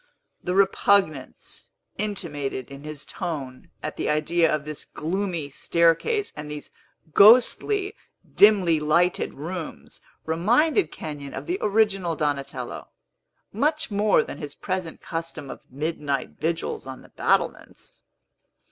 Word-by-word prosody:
The 180 Hz, -, -1 dB
repugnance 195 Hz, -6 st, +1 dB, 0.3 s
intimated 145 Hz, -, -3 dB
in 140 Hz, +1 st, -10 dB
his 150 Hz, -1 st, -6 dB
tone 140 Hz, -8 st, -5 dB
at -, -, -4 dB
the -, -, -1 dB
idea 160 Hz, +2 st, +2 dB
of 150 Hz, -1 st, -1 dB
this 150 Hz, -1 st, -5 dB
gloomy 170 Hz, -2 st, -3 dB
staircase 170 Hz, -, +2 dB
and 150 Hz, 0 st, -7 dB
these 150 Hz, -1 st, -7 dB, 0.4 s
ghostly, 255 Hz, -, +6 dB, 0.4 s
dimly 190 Hz, -6 st, +6 dB
lighted 170 Hz, +4 st, +1 dB
rooms, 165 Hz, +3 st, -7 dB, 0.2 s
reminded 240 Hz, -, +2 dB
Kenyon 145 Hz, -3 st, -7 dB
of -, -, -6 dB
the 360 Hz, +3 st, -2 dB
original 195 Hz, -5 st, +2 dB
Donatello, 145 Hz, -2 st, -3 dB, 0.7 s
much 305 Hz, -2 st, 0 dB
more 205 Hz, 0 st, +3 dB
than -, -, -8 dB
his 150 Hz, -3 st, -6 dB
present 185 Hz, -3 st, -4 dB
custom 165 Hz, -4 st, -5 dB
of -, -, -9 dB
midnight 145 Hz, -1 st, -2 dB
vigils 165 Hz, -4 st, -3 dB
on 130 Hz, -1 st, -8 dB
the -, -, -17 dB
battlements. -, -, -1 dB
165 Hz, 120 wpm, -25 LUFS, 150-200 Hz, 0.7 s, ghostly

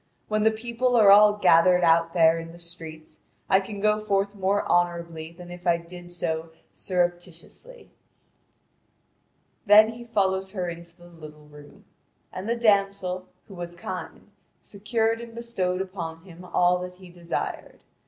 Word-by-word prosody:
When 215 Hz, 0 st, 0 dB
the 220 Hz, -, +5 dB
people 235 Hz, +3 st, -1 dB
are 210 Hz, -4 st, +7 dB
all 210 Hz, +1 st, +7 dB
gathered 180 Hz, -3 st, +4 dB
out 165 Hz, 0 st, +3 dB
there 165 Hz, -1 st, +4 dB
in 165 Hz, 0 st, -9 dB
the -, -, -13 dB
streets, 165 Hz, -2 st, -10 dB, 0.3 s
I 190 Hz, -, +6 dB
can 200 Hz, +1 st, -7 dB
go 210 Hz, +1 st, +2 dB
forth 200 Hz, -1 st, -1 dB
more 200 Hz, 0 st, -1 dB
honourably 170 Hz, -2 st, -1 dB
than 175 Hz, +1 st, -12 dB
if 175 Hz, +1 st, -9 dB
I 170 Hz, -1 st, +4 dB
did 175 Hz, +1 st, -12 dB
so 160 Hz, -2 st, -3 dB, 0.2 s
surreptitiously." 175 Hz, -, -5 dB, 1.8 s
Then 215 Hz, +2 st, +7 dB
he 235 Hz, +1 st, -9 dB
followed 190 Hz, -4 st, 0 dB
her 185 Hz, -3 st, -4 dB
into 170 Hz, 0 st, -9 dB
the 175 Hz, -, -17 dB
little 155 Hz, -3 st, -13 dB
room. 150 Hz, -1 st, -16 dB, 0.5 s
The 205 Hz, +6 st, -2 dB
damsel, 200 Hz, -5 st, +1 dB, 0.2 s
who 200 Hz, -, -12 dB
was 175 Hz, -1 st, -7 dB
kind, 180 Hz, +2 st, -8 dB, 0.3 s
secured 225 Hz, +2 st, -2 dB
and 230 Hz, -1 st, -11 dB
bestowed 190 Hz, -6 st, -2 dB
upon 170 Hz, -4 st, -6 dB
him 180 Hz, -1 st, -13 dB
all 180 Hz, 0 st, +2 dB
that 180 Hz, 0 st, -7 dB
he 185 Hz, -1 st, -15 dB
desired. 175 Hz, -1 st, -5 dB
180 Hz, 150 wpm, -25 LUFS, 170-205 Hz, 1.8 s, are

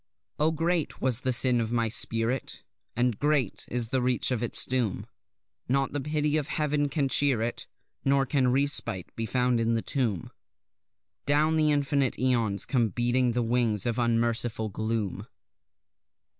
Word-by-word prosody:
Oh, 155 Hz, +1 st, +3 dB
great 165 Hz, 0 st, -1 dB
was 125 Hz, -3 st, 0 dB
the 130 Hz, 0 st, -1 dB
sin 125 Hz, -1 st, +3 dB
of 115 Hz, 0 st, -3 dB
my 115 Hz, -1 st, +1 dB
spirit, 115 Hz, +3 st, 0 dB, 0.3 s
And 120 Hz, -2 st, 0 dB
great 145 Hz, -7 st, 0 dB
is 120 Hz, -2 st, -1 dB
the 130 Hz, +1 st, 0 dB
reach 125 Hz, +1 st, 0 dB
of 120 Hz, -3 st, -1 dB
its 120 Hz, -, +1 dB
doom; 125 Hz, -6 st, -1 dB, 0.6 s
Not 135 Hz, +1 st, 0 dB
the 145 Hz, -, -2 dB
pity 150 Hz, +1 st, 0 dB
of 150 Hz, -2 st, -2 dB
Heaven 150 Hz, -2 st, -1 dB
can 140 Hz, -2 st, 0 dB
cheer 135 Hz, -4 st, +2 dB
it, 120 Hz, -, -4 dB, 0.4 s
Nor 135 Hz, 0 st, +2 dB
can 130 Hz, -2 st, +1 dB
respite 125 Hz, -8 st, 0 dB
be 115 Hz, 0 st, -3 dB
found 125 Hz, -1 st, +1 dB
in 115 Hz, 0 st, +1 dB
the 115 Hz, -, -2 dB
tomb; 115 Hz, -, -2 dB, 1.0 s
Down 150 Hz, +3 st, +2 dB
the 155 Hz, -1 st, +3 dB
infinite 140 Hz, -2 st, 0 dB
aeons 115 Hz, -6 st, +1 dB
come 120 Hz, -5 st, +1 dB
beating 120 Hz, +3 st, +1 dB
the 120 Hz, 0 st, 0 dB
wings 115 Hz, -3 st, +1 dB
of 120 Hz, 0 st, -1 dB
unmerciful 115 Hz, -1 st, 0 dB
gloom. 110 Hz, -1 st, -3 dB
125 Hz, 155 wpm, -27 LUFS, 115-140 Hz, 1.0 s, Oh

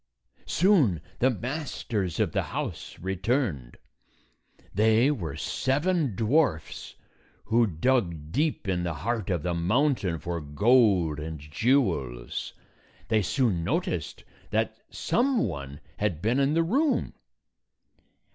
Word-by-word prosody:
Soon 160 Hz, -, +3 dB, 0.2 s
the 130 Hz, -, +4 dB
masters 120 Hz, -, -3 dB
of -, -, +1 dB
the -, -, +1 dB
house -, -, -5 dB
returned. 95 Hz, -, -2 dB, 1.0 s
They 110 Hz, +6 st, +4 dB
were 85 Hz, -, -4 dB
seven 145 Hz, -, 0 dB
dwarfs 115 Hz, -, 0 dB, 0.5 s
who 115 Hz, +1 st, +3 dB
dug 85 Hz, -, 0 dB
deep 150 Hz, -, 0 dB
in 90 Hz, -2 st, 0 dB
the 85 Hz, -2 st, -2 dB
heart 110 Hz, -, -2 dB
of 90 Hz, -5 st, -1 dB
the 90 Hz, -, -1 dB
mountain 100 Hz, -, +1 dB
for 85 Hz, +1 st, -4 dB
gold 90 Hz, -, +3 dB
and 80 Hz, 0 st, -5 dB
jewels. 75 Hz, -, 0 dB, 0.6 s
They 110 Hz, -1 st, +3 dB
soon 100 Hz, -3 st, +1 dB
noticed 165 Hz, -, -2 dB, 0.3 s
that -, -, 0 dB
some 255 Hz, -1 st, +1 dB
one 70 Hz, 0 st, -6 dB, 0.2 s
had 100 Hz, -7 st, -1 dB
been 115 Hz, +9 st, +1 dB
in 140 Hz, +2 st, +2 dB
the 165 Hz, -, +3 dB
room. 265 Hz, -, +1 dB
105 Hz, 115 wpm, -27 LUFS, 85-135 Hz, 1.0 s, the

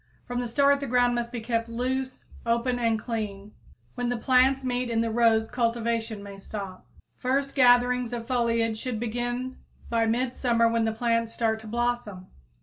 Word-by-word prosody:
From 245 Hz, 0 st, -3 dB
the 245 Hz, -, -2 dB
start 280 Hz, +4 st, +3 dB
the 280 Hz, -, -4 dB
ground 245 Hz, 0 st, +3 dB
must 240 Hz, 0 st, -2 dB
be 240 Hz, -3 st, -4 dB
kept 230 Hz, 0 st, -1 dB
loose, 260 Hz, +2 st, -3 dB, 0.2 s
open 235 Hz, +2 st, 0 dB
and 230 Hz, -2 st, +2 dB
clean. 210 Hz, -3 st, -5 dB, 0.4 s
When 245 Hz, -1 st, -2 dB
the 245 Hz, -, -1 dB
plants 260 Hz, +3 st, +3 dB
meet 250 Hz, -1 st, -1 dB
in 225 Hz, -1 st, +1 dB
the 230 Hz, 0 st, -1 dB
rows 225 Hz, -1 st, +3 dB
cultivation 230 Hz, -3 st, -1 dB
may 200 Hz, -1 st, -9 dB
stop. 195 Hz, -2 st, -7 dB, 0.3 s
First 275 Hz, +2 st, 0 dB
gatherings 245 Hz, -1 st, +4 dB
of 235 Hz, -1 st, -4 dB
foliage 230 Hz, -3 st, 0 dB
should 245 Hz, -3 st, -3 dB
begin 245 Hz, +2 st, -3 dB, 0.3 s
by 230 Hz, -1 st, +2 dB
midsummer 240 Hz, 0 st, +1 dB
when 230 Hz, 0 st, +1 dB
the 220 Hz, -, +1 dB
plants 230 Hz, 0 st, 0 dB
start 220 Hz, -1 st, 0 dB
to 220 Hz, -, -11 dB
blossom. 235 Hz, -5 st, -2 dB
235 Hz, 170 wpm, -26 LUFS, 225-250 Hz, 0.4 s, gatherings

